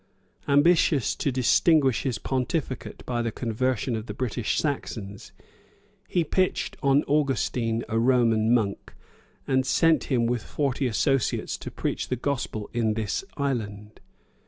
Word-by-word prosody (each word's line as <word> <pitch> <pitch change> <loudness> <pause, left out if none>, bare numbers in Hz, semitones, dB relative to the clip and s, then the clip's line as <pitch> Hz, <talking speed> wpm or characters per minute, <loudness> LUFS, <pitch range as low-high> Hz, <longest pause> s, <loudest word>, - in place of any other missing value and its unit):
Ambitious 145 -2 +4
to 140 - -1
distinguish 130 +2 +3
his 130 -4 -2
pontificate 130 +2 -3
by 120 -1 -1
the 115 -1 -2
conversion 120 +1 -1
of 110 +1 -5
the - - -6
British 120 -3 -2
Saxons, 105 -9 -4 0.8
he 175 - +1
pitched 185 +4 0
on 140 +1 +3
Augustine, 130 -5 0
a 115 - 0
Roman 115 -2 +3
monk, 110 -5 0 0.5
and 130 -1 +2
sent 160 +4 +3
him 120 -4 +1
with 120 0 0
forty 135 0 -1
associates 135 +2 0
to - - -7
preach - - -3
the 125 - -1
gospel 125 -5 -3
in 110 -3 +1
this 110 - -2
island. 110 -7 -3
125 Hz, 135 wpm, -26 LUFS, 115-140 Hz, 0.8 s, Ambitious